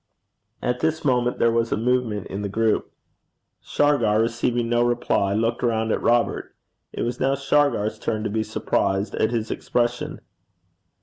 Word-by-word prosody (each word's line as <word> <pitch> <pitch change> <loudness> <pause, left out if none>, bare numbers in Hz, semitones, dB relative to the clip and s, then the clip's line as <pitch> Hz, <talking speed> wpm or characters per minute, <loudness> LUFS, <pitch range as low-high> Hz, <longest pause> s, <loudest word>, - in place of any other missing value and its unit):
At 125 0 0
this 160 +1 -1
moment 125 -2 +1
there 115 - +3
was 115 0 0
a - - +1
movement 115 -3 0
in 100 - -5
the 100 - -3
group. 110 +2 0 0.7
Shargar, 120 -8 +2
receiving 115 +1 0
no 120 0 +2
reply, 120 -4 +1
looked 115 +2 0
round 110 -2 0
at - - 0
Robert. 120 0 +1 0.4
It - - -3
was 120 +1 -3
now 135 +1 +2
Shargar's 140 -6 +1
turn 110 -1 -2
to - - -1
be 110 +1 0
surprised 100 -2 -1
at 110 - +1
his 115 -2 -2
expression. 120 0 -1
115 Hz, 160 wpm, -23 LUFS, 110-125 Hz, 0.7 s, there